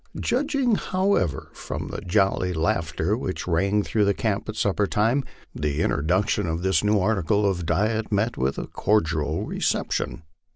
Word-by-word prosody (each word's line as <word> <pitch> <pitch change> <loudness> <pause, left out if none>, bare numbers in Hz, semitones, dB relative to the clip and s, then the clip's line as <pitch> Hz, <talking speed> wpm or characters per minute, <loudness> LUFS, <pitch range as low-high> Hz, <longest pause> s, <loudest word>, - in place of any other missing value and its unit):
Judging, 275 -1 +1
however, 185 - 0
from - - -6
the - - -5
jolly 95 -1 +1
laughter 80 +3 0
which 95 -8 -4
rang 100 +5 +2
through 105 -1 +2
camp 110 0 -2
at 110 - -4
supper 105 -1 +1
time, 115 +8 +1 0.3
the 75 +1 -1
introduction 90 +5 +1
of 80 +2 -2
this 95 -2 +2
new 105 0 +3
article 100 0 +1
of 90 -4 -1
diet 110 +4 0
met 110 +3 +1
with 65 +1 -1
a - - -3
cordial 80 -7 0
reception. - - -2
100 Hz, 150 wpm, -24 LUFS, 85-110 Hz, 0.3 s, new